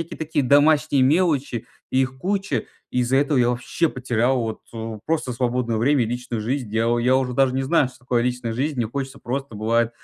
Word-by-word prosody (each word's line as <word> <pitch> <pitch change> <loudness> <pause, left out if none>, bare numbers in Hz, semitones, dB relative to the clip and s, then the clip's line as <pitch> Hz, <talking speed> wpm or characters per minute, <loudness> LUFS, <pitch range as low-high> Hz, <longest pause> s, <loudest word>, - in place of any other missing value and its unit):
Всякие 165 - -6
такие 155 -2 -1
домашние 145 +1 +4
мелочи, 145 -5 +1 0.2
и 130 - +3
их 130 0 -4
куча. 190 - -1 0.3
И 125 - +1
из-за 125 +2 +1
этого 145 +1 +2
я 120 -1 +4
вообще 125 +7 0
потерял 125 -1 0
вот, 110 -1 -3
э, 110 -1 -6
просто 155 -5 -1
свободное 120 -1 -1
время 130 +3 +3
и - - -3
личную 120 -1 -4
жизнь, 120 +1 -2
дела 115 +2 +1
Я 125 +2 +3
уже 130 -1 0
даже 135 0 +3
не 135 +1 -1
знаю, 150 -1 +3
что 130 0 -17
такое 120 -1 0
личная 125 -2 -2
жизнь. 140 +5 -2
Мне 120 -2 0
хочется 135 +3 -5
просто, 135 -2 -4
бывает, 115 +2 +1
130 Hz, 210 wpm, -22 LUFS, 120-140 Hz, 0.3 s, домашние